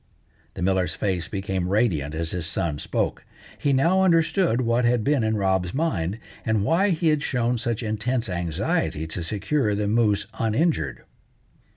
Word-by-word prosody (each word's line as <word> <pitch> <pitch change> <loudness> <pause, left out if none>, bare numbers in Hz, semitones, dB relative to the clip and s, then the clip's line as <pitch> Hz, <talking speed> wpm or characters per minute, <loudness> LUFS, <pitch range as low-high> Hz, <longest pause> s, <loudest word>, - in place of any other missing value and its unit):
The 90 - -4
miller's 95 -3 +1
face 90 -4 -1
became 95 -2 -2
radiant 90 -9 +1
as 80 0 -2
his 90 -2 -3
son 85 -4 -2
spoke. - - -2 0.4
He 145 - +1
now 170 +8 +3
understood 165 - +3
what 120 0 +1
had 120 -1 +2
been 140 -2 +2
in 110 0 +1
Rob's 95 -1 0
mind, 105 - -1 0.3
and 110 -3 +1
why 170 - +3
he 165 -2 +2
had 150 -1 +2
shown 125 -3 0
such 120 -1 -2
intense 115 +3 -1
anxiety 85 -3 -1
to 80 +3 -5
secure 105 - 0
the 105 0 -1
moose 105 -1 +2
uninjured. 140 +9 0
110 Hz, 160 wpm, -24 LUFS, 95-130 Hz, 0.4 s, now